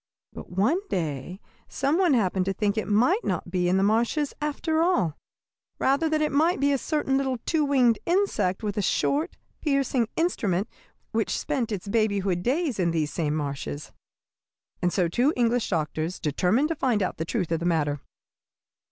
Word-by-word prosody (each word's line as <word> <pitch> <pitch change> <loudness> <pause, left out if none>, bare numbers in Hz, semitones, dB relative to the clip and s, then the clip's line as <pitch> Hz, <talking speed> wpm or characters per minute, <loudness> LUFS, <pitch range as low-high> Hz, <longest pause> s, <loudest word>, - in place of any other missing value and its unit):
But - - -9
one 210 - +2
day 165 - -3 0.3
some 280 +6 0
one 350 -7 +4
happened 190 -4 +1
to 195 - 0
think 205 +1 0
it 215 - -2
might 250 - +3
not 175 - -2
be 180 -1 +1
in 185 - +3
the 190 - +2
marshes, 235 +8 +1
after 315 +2 0
all; 190 - +2 0.6
rather 280 +4 +2
that 310 0 +1
it 305 - 0
might 315 +4 +2
be 285 +1 +3
a 275 - +1
certain 295 -3 0
little 265 -2 0
two 320 -2 +1
winged 255 -6 +3
insect 345 - +1
with 205 -1 -3
a - - +2
short, 295 - 0 0.2
piercing 275 -5 +1
instrument, 205 - 0 0.4
which 225 -1 0
spent 260 -7 -2
its 200 -1 -4
babyhood 200 -4 +1
days 270 - 0
in 175 -2 +2
these 160 -3 -1
same 155 -3 -1
marshes. 145 -1 -4 0.9
"And 175 - +1
so 180 -2 +1
two 245 - +2
English 240 -1 +1
doctors 160 +1 -2
determined 185 - +1
to 330 - -1
find 245 -8 +1
out - - -3
the 160 - -2
truth 165 0 -2
of 165 - +1
the 170 - -1
matter. 150 -4 0
220 Hz, 180 wpm, -26 LUFS, 180-285 Hz, 0.9 s, one